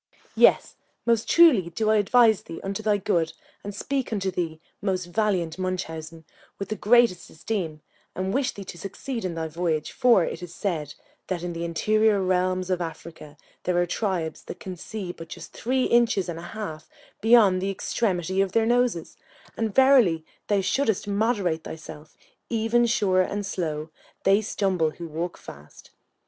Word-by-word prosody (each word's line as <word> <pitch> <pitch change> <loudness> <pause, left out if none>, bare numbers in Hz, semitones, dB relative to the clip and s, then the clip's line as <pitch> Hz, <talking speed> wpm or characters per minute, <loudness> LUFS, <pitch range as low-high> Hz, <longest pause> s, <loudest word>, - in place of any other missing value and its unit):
Yes, - - +4 0.3
most 230 -2 +1
truly 275 - +6
do 215 +5 0
I 220 - +4
advise 220 0 +4
thee 165 - -9
unto 195 +2 -3
thy 210 -1 +2
good, 170 -4 0 0.3
and 205 0 -6
speak 270 +3 -2
unto 195 -3 -1
thee, 165 -3 -3 0.2
most 190 -3 -1
valiant 180 -3 -1
Munchausen, 165 -3 -4 0.3
with 200 - -5
the 215 - -1
greatest 230 -4 +3
esteem, 160 -3 -4 0.3
and 190 +1 -2
wish 270 0 +1
thee 200 - -9
to 175 -2 -9
succeed 225 +6 -5
in 180 -3 -3
thy 160 -1 -2
voyage; 160 -1 -2
for 240 -9 +4
it 165 - -5
is 175 -1 -9
said, 155 -7 -3 0.3
that 180 -2 -3
in 175 -1 -3
the 170 0 -4
interior 215 +5 +2
realms 185 0 0
of 180 -1 0
Africa 160 -2 -8 0.2
there 180 -1 0
are 175 - +3
tribes 175 -4 -2
that - - -8
can 185 -1 -6
see 190 +1 -6
but 165 -1 -10
just 165 0 -10
three 255 +2 0
inches 235 -7 +3
and 170 -1 -5
a 170 +1 -9
half 160 -7 -6 0.3
beyond 215 -5 +5
the 195 - -1
extremity 190 -2 -1
of 195 -1 -1
their 225 -1 +3
noses; 240 -7 0 0.4
and 220 -3 -2
verily 250 - +5 0.2
thou 205 -2 +2
shouldest 220 +1 0
moderate 200 -6 0
thyself, 155 -1 -10 0.3
even 230 +1 +2
sure 190 -5 +2
and 200 +2 -2
slow; 155 -5 -3 0.3
they 195 +2 +4
stumble 190 -6 0
who 170 +3 -8
walk 165 +3 -4
fast. 75 +2 -13
185 Hz, 170 wpm, -25 LUFS, 170-220 Hz, 0.4 s, truly